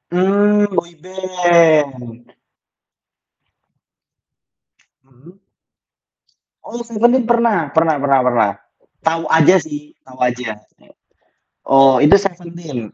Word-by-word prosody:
Mmm, 205 +3 +2
boyband. 170 -9 -1 2.7
Mmm. 140 +9 -22 1.3
Oh, 235 - -8
Seventeen 235 +2 +1
pernah. 225 - 0
Pernah 160 -1 +1
pernah 140 -1 +2
pernah. 115 -5 +1 0.5
Tahu 165 0 -2
aja 160 +3 +4
sih, 150 -1 -10
tahu 130 -1 -17
aja. 120 -3 -3 1.1
Oh 135 -1 +4
itu 150 +8 +5
Seventeen? 170 - -8
160 Hz, 80 wpm, -16 LUFS, 135-185 Hz, 2.7 s, itu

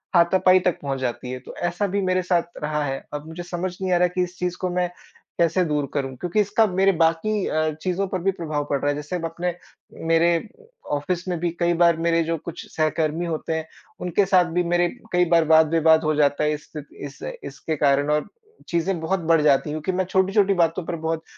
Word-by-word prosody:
हाथापाई 185 +2 +5
तक 180 -1 0
पहुँच 135 -2 -3
जाती 125 0 -3
है, 130 - -5
तो 125 - -12
ऐसा 175 +4 -1
भी 200 +2 -1
मेरे 185 -1 +1
साथ 175 -1 -1
रहा 150 0 -1
है। 135 -1 -4
अब 150 +1 -5
मुझे 170 +2 -7
समझ 175 +1 -4
नहीं 185 - -1
आ - - +4
रहा 180 - +3
है 180 - +3
कि 180 - +2
इस 180 0 -7
चीज़ 180 0 -2
को 185 - 0
मैं 180 -1 +1 0.5
कैसे 170 +2 +3
दूर 150 -2 0
करूँ 135 -2 -2
क्योंकि 180 - -1
इसका 215 +2 +3
मेरे 190 +1 +3
बाकी 175 +5 +1
अ, 155 0 0
चीज़ों 185 +1 -1
पर 185 - -2
भी 195 +2 +2
प्रभाव 155 -5 -3
पड़ 140 - +1
रहा 145 - 0
है 145 - 0
जैसे 150 +4 -5
अपने 170 +2 -3 0.5
मेरे 165 +1 +4
अ, 465 - -11 0.3
ऑफ़िस 175 +5 -3
में 175 -2 -1
भी 175 +1 0
कई 175 0 +2
बार 170 -2 +4
मेरे 165 0 +2
जो 165 0 -1
कुछ 170 +3 -8
सहकर्मी 155 +1 0
होते 165 -1 -3
हैं, 160 0 -4 0.3
उनके 180 +3 +1
साथ 185 -2 +4
भी 180 +1 +2
मेरे 175 0 +2 0.3
कई 180 0 +4
बार 165 -1 +4
वाद-विवाद 160 0 +5
हो 155 -1 +1
जाता 145 0 +2
है 150 - +2
इस 150 0 -6
स्थि 150 -2 -7 0.2
इस 140 - -10 0.2
इसके 145 +3 -4
कारण 140 0 +2
और 150 0 +2
अ, - - -18 0.4
चीज़ें 170 +1 0
बहुत 185 +4 0
बढ़ 165 -1 +3
जाती 150 -1 +3
है - - -3
क्योंकि 155 +4 -2
मैं 185 - +1
छोटी-छोटी 195 +1 +3
बातों 170 -1 +1
पर 170 - -3
बहुत 160 0 -1
170 Hz, 230 wpm, -23 LUFS, 155-180 Hz, 0.5 s, हाथापाई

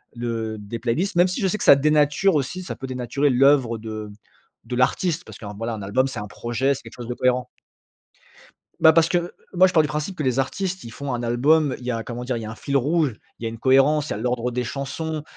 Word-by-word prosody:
de 115 -2 -3
des 105 +3 -6
playlists, 165 - -1
même 175 +1 +6
si 185 - -3
je 190 - +2
sais 215 +3 -1
que - - -3
ça - - +9
dénature 150 +5 +3
aussi. 150 +7 -2
Ça - - -6
peut 135 - -7
dénaturer 130 +3 0
l'œuvre 130 -3 +4
de 110 -1 -6 0.6
de 125 - -4
l'artiste 165 +7 +1
parce - - -11
qu' - - -15
un, 100 - -6
voilà, 115 +2 -3
un 105 - -7
album 130 +7 +1
c'est 130 - -6
un 105 - -6
projet, 120 +6 -1
c'est - - -9
quelque 115 - -12
chose 120 -2 -8
de 125 - -2
cohérent. 125 0 +1 1.3
Bah 160 0 +7
parce 165 0 +4
que 175 0 -1 0.2
moi 185 +1 +7
je 185 - +1
pars 160 - +6
du 150 - -1
principe 150 +6 -3
que 155 - -5
les 130 -1 0
artistes, 190 +7 -2
ils 115 - -9
font 140 +2 -5
un 120 -1 -3
album, 140 +4 +3
il 125 - -11
y - - -2
a 115 -1 -3
comment 120 0 -6
dire 125 -1 -2
il 115 - -5
y - - -5
a 110 - -6
un - - -8
fil 140 +3 -1
rouge, 145 -2 +1 0.2
il - - -10
y - - -2
a - - -2
une 115 - -8
cohérence, 135 +4 +3
il - - -5
y - - +1
a - - -4
l'ordre 125 +1 -1
des 125 +1 -2
chansons. 150 +4 -4
130 Hz, 270 wpm, -23 LUFS, 120-155 Hz, 1.3 s, ça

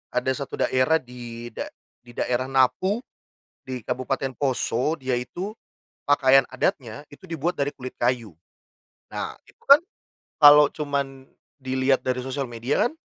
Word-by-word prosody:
ada 125 +1 +1
1 140 0 -4
daerah 130 +5 +2
di 120 -3 -6
da - - -5 0.3
di 120 -1 -17
daerah 125 +1 -1
Napu 185 - +2 0.6
di 125 -3 -5
Kabupaten 130 +2 -2
Poso, 135 +2 0
dia 130 -3 -1
itu 180 +11 -5 0.5
pakaian 135 -1 +5
adatnya 145 - -2
itu 145 - -17
dibuat 165 +2 -1
dari 140 0 -1
kulit 130 -2 -9
kayu. 120 -6 -1 0.7
Nah, - - -4 0.2
itu - - -23
kan 280 +3 +8 0.6
kalo 150 0 +8
cuman 140 -3 -3 0.3
dilihat 130 +1 +1
dari 130 0 -2
sosial 135 -1 -3
media 120 - 0
kan - - -13
130 Hz, 140 wpm, -24 LUFS, 125-145 Hz, 0.7 s, kan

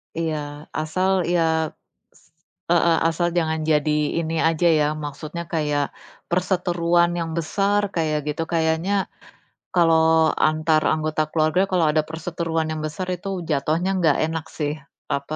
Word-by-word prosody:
Iya. 160 -2 -1 0.4
Asal, 185 +5 0 0.2
ya, 170 - +3 0.8
s - - -28 0.5
heeh, 170 -1 +4
asal 175 +1 0
jangan 160 -1 0
jadi 150 0 +2 0.3
ini 165 0 -3
aja, 165 +1 +1
ya, 150 - +3 0.2
maksudnya 155 +4 -6
kayak 150 -2 +1 0.5
perseteruan 175 -1 +2
yang 165 -1 -3
besar 200 +5 +1
kayak 155 -2 0
gitu. 165 +2 -3
Kayaknya, 165 +4 +1 0.8
kalau 160 -2 +4 0.2
antar 155 0 +2
anggota 155 0 -1
keluarga 155 +3 +2
kalau 175 -3 +3
ada 155 0 +2
perseteruan 165 -1 -2
yang 155 - -3
besar 180 +4 -4
itu 180 +3 -10 0.2
jatuhnya 155 +5 0
nggak 155 -5 +3
enak, 160 0 -4
sih, 150 -1 -1 0.4
apa, 140 +2 -5
160 Hz, 135 wpm, -22 LUFS, 155-170 Hz, 0.8 s, heeh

